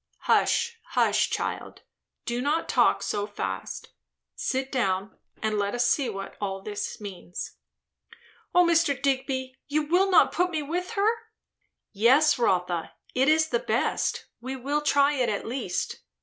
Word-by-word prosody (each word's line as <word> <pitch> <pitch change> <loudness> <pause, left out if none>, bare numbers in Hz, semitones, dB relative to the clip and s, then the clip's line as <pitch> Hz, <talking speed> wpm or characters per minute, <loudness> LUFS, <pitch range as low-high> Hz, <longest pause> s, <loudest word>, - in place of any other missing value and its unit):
"Hush, 470 -1 +2
hush, - - +2
child! - - -4 0.4
do 240 +1 -2
not 300 +5 0
talk - - +3
so 205 0 -2
fast. - - -5 0.5
Sit 265 0 -2
down, 195 -5 -1 0.3
and 215 -1 0
let 200 +2 -1
us 245 - +2
see 270 -5 +2
what 195 -2 -6
all 195 -1 -3
this 205 -1 -4
means." 190 -4 -7 1.0
"O 355 0 +7
Mr. 330 -5 +3
Digby, 265 -1 -1
you 300 +1 +1
will 360 +6 +3
not 370 - +5
put 360 +2 +1
me 315 -4 -2
with 355 +7 -3
her?" 405 -1 +2 0.8
"Yes, 260 +8 +4
Rotha, 180 -6 0 0.2
it 260 +1 +2
is 315 0 +3
the 485 - +1
best. - - -1
We 260 +3 -5
will 280 +4 -1
try 285 0 +3
it, 255 -4 +1
at 205 - -2
least. 225 -7 -3
265 Hz, 150 wpm, -26 LUFS, 210-310 Hz, 1.0 s, O